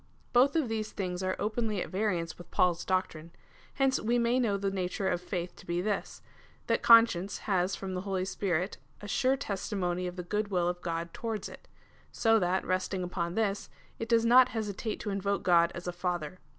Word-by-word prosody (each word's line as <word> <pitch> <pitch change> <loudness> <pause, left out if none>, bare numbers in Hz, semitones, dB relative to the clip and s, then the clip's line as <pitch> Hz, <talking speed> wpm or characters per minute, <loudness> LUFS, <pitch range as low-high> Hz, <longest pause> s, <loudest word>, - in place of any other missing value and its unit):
Both 260 +4 +5
of 315 -6 +2
these 220 -1 -3
things 180 -2 -3
are 185 0 -1
oi)enly 215 -1 -1
at - - -4
variance 185 -5 -1
with 175 - -13
Paul's 175 -1 +2
doctrine. 170 -4 -2 0.5
Hence 270 -1 +2
we 235 +3 +1
may 240 +1 +2
know 215 -5 +1
the 195 0 -1
nature 190 0 -2
of 175 - 0
faitli 180 -1 -4
to - - -15
be 175 0 -1
this, 205 +2 -3 0.4
that - - +1
conscience 225 -5 +5
has 190 -1 +1
from 190 -1 -5
the 180 - -2
Holy 190 -1 -2
Spirit 190 -1 -2 0.2
a 205 - -8
sure 260 +5 +2
testimony 190 -6 -2
of 180 - -6
the 180 - -5
good 210 +4 -1
will 180 -3 0
of 175 0 -2
God 170 -1 -3
towards 225 -4 -4
it, - - -13 0.4
so 225 -1 +3
that, 185 0 0
resting 185 0 -1
ujion 170 -1 -3
tliis, 205 -3 -1 0.3
it 225 - -4
does 230 -1 +4
not 250 +2 +7
hesitate 215 0 -3
to 205 - -3
invoke 200 0 -1
God 170 -1 +4
as 175 +1 -7
a 175 - -2
Father. 175 -1 -3
195 Hz, 200 wpm, -30 LUFS, 180-220 Hz, 0.5 s, not